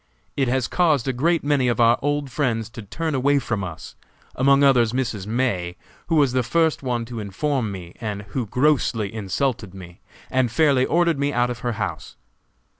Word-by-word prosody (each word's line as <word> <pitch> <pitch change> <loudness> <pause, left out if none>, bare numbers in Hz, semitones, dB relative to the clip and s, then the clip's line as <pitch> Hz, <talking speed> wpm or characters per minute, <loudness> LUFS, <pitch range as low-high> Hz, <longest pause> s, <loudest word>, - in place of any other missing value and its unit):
It 135 -2 +1
has 130 -1 0
caused 155 -8 +2
a 130 - +1
great 165 +7 +1
many 145 -3 +2
of 120 -2 0
our 115 0 +5
old 145 -1 -1
friends 115 -5 -1
to 115 - -8
turn 155 +10 -4
away 140 +2 +2
from 110 -6 -2
us, 85 -4 -8 0.4
among 140 +2 +4
others 125 -5 +4
Mrs. 120 -6 -2
May, 105 -7 -1 0.3
who 165 - +1
was 140 -5 +3
the 130 - +2
first 160 +6 +1
one 120 -3 -2
to 115 -1 -7
inform 110 +3 -2
me, 90 -3 -8
and 105 -3 -4
who 120 0 -3
grossly 125 -5 +1
insulted 110 -1 -2
me 90 -2 -11 0.3
and 130 -3 +1
fairly 135 -1 +3
ordered 170 -3 +2
me 140 0 +1
out 120 -1 +1
of 120 - -6
her 120 -1 -2
house. - - -5
125 Hz, 190 wpm, -22 LUFS, 110-140 Hz, 0.4 s, our